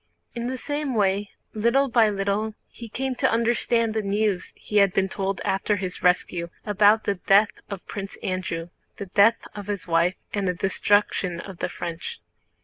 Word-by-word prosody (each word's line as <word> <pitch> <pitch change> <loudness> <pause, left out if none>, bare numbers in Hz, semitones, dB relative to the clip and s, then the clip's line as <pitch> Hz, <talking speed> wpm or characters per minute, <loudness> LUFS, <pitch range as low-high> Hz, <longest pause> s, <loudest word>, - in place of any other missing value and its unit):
In 235 0 -3
the 260 +1 -3
same 290 0 -2
way 200 -1 +1 0.2
little 235 +6 +2
by 230 -3 +4
little 205 +2 -1
he 235 -1 -10
came 265 +4 -2
to - - +3
understand 230 0 +1
the 220 - 0
news 205 -1 0
he 210 - -3
had 200 -2 +5
been 195 0 +3
told 195 0 -3
after 195 +2 +1
his 185 -2 -5
rescue, 180 -1 +1 0.2
about 210 +1 +4
the 200 - +1
death 200 +3 +4 0.2
of 200 -3 -7
Prince 195 -1 -6
Andrew, 175 -2 -3 0.3
the 200 - -5
death 200 +4 +4
of 205 -1 -8
his 200 -5 -4
wife, 170 +2 +2 0.2
and 200 -2 0
the 180 - 0
destruction 195 -1 +1
of 190 0 -9
the - - -1
French. 175 - -6
205 Hz, 175 wpm, -25 LUFS, 190-220 Hz, 0.3 s, had